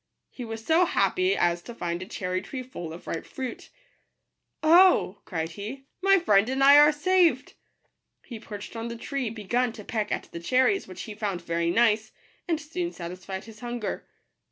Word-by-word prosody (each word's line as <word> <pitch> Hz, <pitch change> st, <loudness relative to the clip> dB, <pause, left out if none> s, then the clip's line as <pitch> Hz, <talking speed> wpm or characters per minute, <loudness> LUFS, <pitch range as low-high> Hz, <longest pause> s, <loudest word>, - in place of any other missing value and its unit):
He 250 Hz, -, -8 dB
was 225 Hz, -1 st, -7 dB
so 330 Hz, +3 st, +4 dB
happy 370 Hz, +1 st, +1 dB
as 175 Hz, 0 st, +1 dB
to 235 Hz, +6 st, -10 dB
find 175 Hz, -4 st, -3 dB
a 185 Hz, -, -7 dB
cherry 185 Hz, -4 st, -3 dB
tree 255 Hz, +6 st, -6 dB
full 175 Hz, -10 st, -8 dB
of 165 Hz, -, -10 dB
ripe 165 Hz, -, -4 dB
fruit 260 Hz, -3 st, -7 dB, 0.5 s
" -, -, -53 dB, 0.2 s
Oh," 365 Hz, -, +4 dB
cried 165 Hz, -2 st, -3 dB
he, 215 Hz, +10 st, -8 dB
" -, -, -53 dB
my 390 Hz, +1 st, +5 dB
friend 210 Hz, -, +3 dB
and 265 Hz, +1 st, +1 dB
I 285 Hz, +1 st, +9 dB
are 295 Hz, +1 st, +7 dB
saved 350 Hz, +3 st, +2 dB
I" -, -, -38 dB
He 235 Hz, -3 st, -7 dB
perched 210 Hz, 0 st, -9 dB
on 225 Hz, 0 st, -4 dB
the 235 Hz, -, -5 dB
tree, 270 Hz, 0 st, -3 dB
begun 230 Hz, +3 st, -1 dB
to 215 Hz, -, -10 dB
peck 215 Hz, 0 st, -3 dB
at -, -, -1 dB
the 170 Hz, -, -6 dB
cherries, 260 Hz, -, +2 dB
which 185 Hz, -1 st, -8 dB
he 215 Hz, -, -7 dB
found 205 Hz, -5 st, -3 dB
very 170 Hz, 0 st, -1 dB
nice, 220 Hz, +1 st, +2 dB, 0.4 s
and 330 Hz, -3 st, 0 dB
soon 345 Hz, +3 st, -4 dB
satisfied 185 Hz, -, -7 dB
his 220 Hz, -1 st, -13 dB
hunger. 240 Hz, -3 st, -5 dB
225 Hz, 195 wpm, -26 LUFS, 190-275 Hz, 0.5 s, I